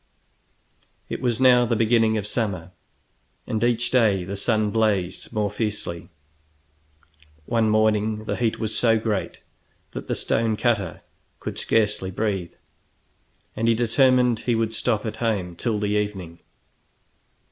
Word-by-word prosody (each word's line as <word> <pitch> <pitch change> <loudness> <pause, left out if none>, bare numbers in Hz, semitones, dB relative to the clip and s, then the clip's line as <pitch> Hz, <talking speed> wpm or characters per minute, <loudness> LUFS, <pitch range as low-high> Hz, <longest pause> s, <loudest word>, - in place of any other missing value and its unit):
It - - -4
was 120 -2 0
now 125 -2 +6
the 120 -1 0
beginning 115 0 +3
of 105 - -3
summer, 100 -6 -3 0.7
and 110 0 -2
each 120 0 +1
day 110 -7 +3
the 95 +3 -5
sun 110 0 0
blazed 100 -5 0
more 105 -3 -1
fiercely. 105 -6 -4 1.4
One 115 -2 +1
morning 110 0 +1
the - - -2
heat 115 -2 0
was 110 -1 -1
so 115 -2 +4
great 110 -3 -3 0.5
that - - -7
the - - -1
stone 110 -1 0
cutter 105 -8 0 0.4
could - - -4
scarcely 105 -4 +1
breathe, 95 -3 -2 1.0
and 115 - -1
he 115 - +4
determined 125 0 +3
he 120 - 0
would 115 0 -1
stop 110 -1 0
at 110 - -4
home 100 -7 -1
till 110 +4 -1
the 105 0 -1
evening. 105 -5 -3
110 Hz, 135 wpm, -23 LUFS, 105-115 Hz, 1.4 s, now